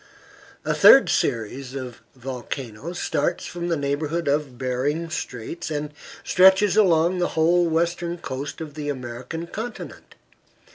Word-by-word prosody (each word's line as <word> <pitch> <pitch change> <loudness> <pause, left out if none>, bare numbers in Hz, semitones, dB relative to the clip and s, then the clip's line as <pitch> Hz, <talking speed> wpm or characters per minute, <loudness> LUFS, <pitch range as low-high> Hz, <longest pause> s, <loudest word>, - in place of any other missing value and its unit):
A - - +1
third - - +7
series 125 +4 -1
of 125 -3 -7
volcanoes 130 +3 -6
starts 160 +3 -1
from 175 0 -5
the 170 -2 0
neighborhood 145 +3 -2
of 140 -3 0
Behring's 140 +6 -2
Straits, 125 +9 -5
and 150 -1 -4 0.3
stretches 190 +2 +5
along 180 -3 +3
the 175 - +2
whole 170 +2 +4
western 170 +1 -1
coast 140 -1 -6
of 155 -2 -7
the 145 0 -5
American 130 +5 -5
continent. 225 +7 -8
150 Hz, 130 wpm, -23 LUFS, 130-170 Hz, 0.3 s, third